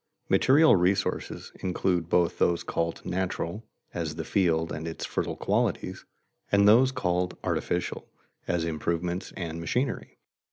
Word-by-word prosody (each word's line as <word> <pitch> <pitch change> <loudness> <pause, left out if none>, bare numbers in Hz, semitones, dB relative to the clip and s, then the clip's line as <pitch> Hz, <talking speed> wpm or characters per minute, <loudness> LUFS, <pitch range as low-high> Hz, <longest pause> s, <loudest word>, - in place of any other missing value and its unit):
_ - - -39
Material 145 0 +6
resources 90 +2 0
include 90 -2 0
both 85 -1 +2
those 85 -1 +2
called 85 0 -2
natural 95 +2 -2 0.3
(as 80 -3 -3
the 80 - -4
field 85 -4 +1
and 80 +2 -4
its 80 - -5
fertile - - -2
qualities), - - -1 0.5
and 100 0 +5
those 125 +5 +6
called 90 -8 -1
artificial - - -2 0.4
(as 85 -2 0
improvements 85 +3 -2
and 85 -2 -4
machinery). 125 - -2
90 Hz, 130 wpm, -27 LUFS, 85-100 Hz, 0.5 s, Material